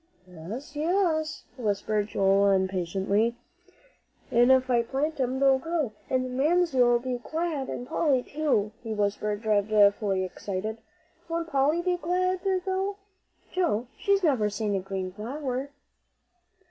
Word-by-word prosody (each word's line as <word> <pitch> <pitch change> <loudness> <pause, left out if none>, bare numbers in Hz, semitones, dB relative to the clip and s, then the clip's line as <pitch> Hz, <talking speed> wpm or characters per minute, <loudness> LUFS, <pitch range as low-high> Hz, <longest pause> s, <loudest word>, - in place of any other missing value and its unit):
"Yes 190 - -8
yes," 315 -1 0
whispered 210 -2 -1
Joel, 200 0 +3
impatiently. 195 +4 +1 1.0
"An' 240 +1 +5
if 260 -1 +5
I 245 -2 +3
plant 275 +6 -2
'em, 260 0 0
they'll 270 -1 +4
grow, 320 -5 -1 0.2
and 255 -1 +1
then 255 0 -5
Mamsie'll 270 -6 +3
be 250 0 -3
glad, 315 0 -3
an' 245 - -5
Polly 265 -2 +1
too," 275 -9 0
he 225 -2 -4
whispered, 210 +1 -1
dreadfully 205 -2 +3
excited. 200 +4 -4 0.5
"Won't 335 0 -2
Polly 295 +5 +2
be 360 0 +1
glad 365 +2 0 0.3
though, 385 +1 -1 0.6
Joe? 325 - 0
She's 400 -1 +1
never 255 -10 +2
seen 210 0 -2
a 195 - +1
green 190 0 -4
flower." 255 +6 -4
250 Hz, 130 wpm, -27 LUFS, 205-310 Hz, 1.0 s, An